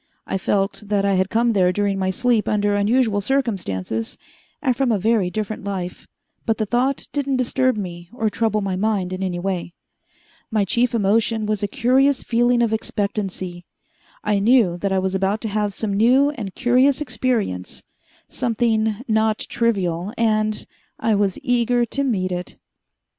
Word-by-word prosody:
I 190 - -2
felt 195 +2 0
that 200 -1 +1
I 200 - +2
had 190 0 +1
come 230 +1 +2
there 185 -3 +3
during 200 0 0
my 190 0 0
sleep 235 +3 +1
under 205 -1 +1
unusual 210 +1 +2
circumstances 185 - -2 0.4
and 255 -4 +1
from 265 -1 +1
a 215 - +2
very 210 -2 +1
different 215 +3 -4
life, 185 -3 -5 0.4
but 225 -1 0
the 215 - 0
thought 250 +5 0
didn't 280 -2 0
disturb 255 0 +1
me 175 -3 -6
or 225 -2 -1
trouble 215 0 0
my 195 -2 -2
mind 195 -2 0
in 185 - -5
any 185 -2 -2
way. 175 -1 -3 0.7
My 215 -3 +1
chief 240 +5 +1
emotion 220 +1 +1
was 210 -1 -1
a 205 - 0
curious 260 +6 +2
feeling 240 +1 +2
of 225 -1 +1
expectancy. 195 -5 -3 0.6
I 210 -1 +1
knew 215 -4 +4
that 200 +1 -1
I 190 - +2
was 190 0 0
about 195 +2 0
to 220 - -3
have 210 0 0
some 205 0 -3
new 255 +8 +4
and 210 -10 -7
curious 255 +2 +3
experience, 235 - -2 0.4
something 225 -2 0
not 220 -1 +2
trivial, 195 -5 0
and 215 -2 +1 0.3
I 225 - +1
was 200 -2 +1
eager 245 -2 +2
to 280 +4 -2
meet 190 -8 0
it. 180 0 -5
215 Hz, 165 wpm, -21 LUFS, 195-240 Hz, 0.7 s, knew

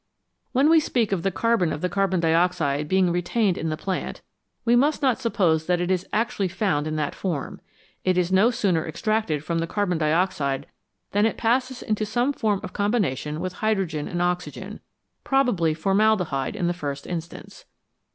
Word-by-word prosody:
When 270 +3 +3
we 325 +1 +6
speak 240 -8 0
of 190 -4 0
the 195 - +1
carbon 210 -3 +1
of 150 - -4
the 180 - +1
carbon 190 -1 0
dioxide 165 -3 +1
being 185 +1 +3
retained 180 +3 +1
in 160 - -3
the 155 - -2
plant, 190 +3 -4 0.4
we 235 0 +4
must 285 +4 +2
not 260 -3 +2
suppose 175 -10 +1
that 180 -1 +2
it 175 +1 -1
is 185 -1 0
actually 215 -3 0
found 175 -6 -1
in 155 - -2
that 150 -2 -1
form; 170 -8 -4 0.4
it 185 -1 +2
is 180 0 +1
no 195 +5 +5
sooner 195 -9 +1
extracted 170 -3 -1
from 165 +1 -1
the 165 - -1
carbon 180 -3 -1
dioxide 155 -4 0 0.5
than 205 +2 +3
it - - -3
passes 255 +2 0
into 215 0 -1
some 240 +6 0
form 210 -6 0
of 180 - -7
combination 185 - -1
with 185 +1 -3
hydrogen 190 -9 0
and 175 0 -1
oxygen, 180 0 -3 0.4
probably 245 -12 +2
formaldehyde 190 -6 +1
in 175 - -1
the 175 - +1
first 145 -5 -5
instance. 175 - -7
185 Hz, 180 wpm, -24 LUFS, 165-220 Hz, 0.5 s, we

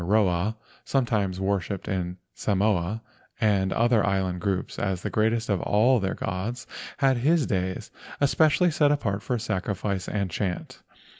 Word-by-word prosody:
6 85 - -4
LEGENDS 105 - +5
OF 110 - +4
GHOSTS 90 +1 +1
Tanaroa, 110 - -35 0.2
sometimes 105 -8 0
worshipped 95 -1 -2
in 90 -1 -2 0.2
Samoa 100 0 0 0.4
and 100 -4 +2
other 115 -2 +3
island 95 -2 0
groups 95 -1 -2
as 95 -3 -1
the - - -3
greatest 110 +1 +1
of 100 -4 0
all 120 +5 +3
their 95 -1 -1
gods—had 120 +6 -2
his 150 +4 +3
days 95 -3 -2 0.3
especially 155 +4 +3
set 145 -1 +3
apart 105 -9 0
for 125 +3 -1
sacri¬ 105 -3 -2
fice 95 -1 -3
and 100 -3 -2
chant. 90 -2 -3
100 Hz, 160 wpm, -26 LUFS, 95-120 Hz, 0.4 s, LEGENDS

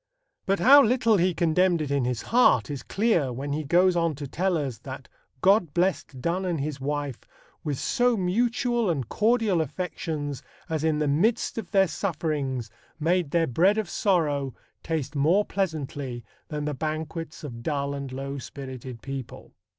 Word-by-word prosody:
But 195 +1 +2
how 280 +4 +8
little 230 -3 +3
he 180 -1 +2
condemned 175 +1 +3
it 150 -2 -3
in 140 -3 +1
his 125 -2 -2
heart 245 -9 +5
is 140 -3 -4
clear 195 - +1
when 140 +4 -4
he 155 +1 -2
goes 175 +5 +4
on 165 -3 +1
to 145 +1 -6
tell 180 +5 0
us 135 -6 -3
that 130 -1 -8 0.3
God 185 -6 +3
blessed 175 -6 0
Donne 170 +8 -1
and 175 -4 -1
his 140 -1 -4
wife 145 -2 -2 0.4
"with 145 -3 -2
so 245 - +2
mutual 230 +4 +1
and 140 -8 -1
cordial 215 - +2
affections, 155 -3 -4 0.3
as 160 -1 -2
in 160 -1 +2
the 150 0 0
midst 215 +11 +1
of - - -7
their 195 -2 +4
sufferings 150 - -2 0.3
made 170 0 +1
their 165 +2 +2
bread 180 - +3
of 215 -3 -1
sorrow 150 - 0 0.3
taste 155 -3 -3
more 165 +9 +3
pleasantly 145 -9 -3 0.2
than 150 -1 -4
the 150 - -1
banquets 155 +2 -4
of 120 -6 -7
dull 140 +1 -1
and 140 -2 -5
low 135 +1 -5
spirited 130 -3 -8
people." 135 -3 -7
155 Hz, 165 wpm, -26 LUFS, 140-185 Hz, 0.4 s, how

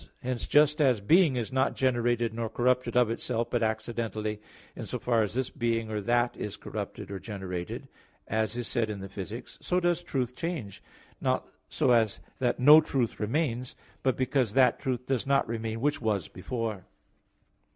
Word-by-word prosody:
Hence 125 -1 -2
just 150 +1 +4
as 130 -6 +4
being 155 - +4
is 120 -1 -2
not 130 +1 +2
generated 120 -3 +1
nor 115 0 -3
corrupted 125 +1 +1
of 120 -2 +4
itself, 115 0 -2
but 120 - +1
accidentally, 110 -1 -2 0.3
in - - -6
so - - -2
far 120 -2 +1
as 105 +1 -2
this 130 0 -1
being 115 -2 -1
or 105 -1 -2
that 120 +3 +1
is 105 - -5
corrupted - - -6
or 100 - -4
generated, 95 -5 -5 0.4
as 110 +1 -1
is 120 - -3
said 115 -3 0
in 105 -2 -4
Phys. 95 0 -6
i, - - -10 0.2
so 180 - +1
does 175 -1 +1
truth 130 -7 -2
change, 135 - -4 0.4
not - - 0 0.2
so - - +2
as 115 -4 +3 0.2
that 125 -2 +1
no 150 +5 +9
truth 130 -6 -1
remains, 125 +1 -1 0.3
but 130 -1 +1
because 130 -4 +1
that 130 -2 +5
truth 125 -1 -2
does 135 -1 -1
not 140 0 +3
remain 115 0 -3
which 145 0 +1
was 105 -8 0
before. 110 0 -4
120 Hz, 175 wpm, -29 LUFS, 110-130 Hz, 0.4 s, no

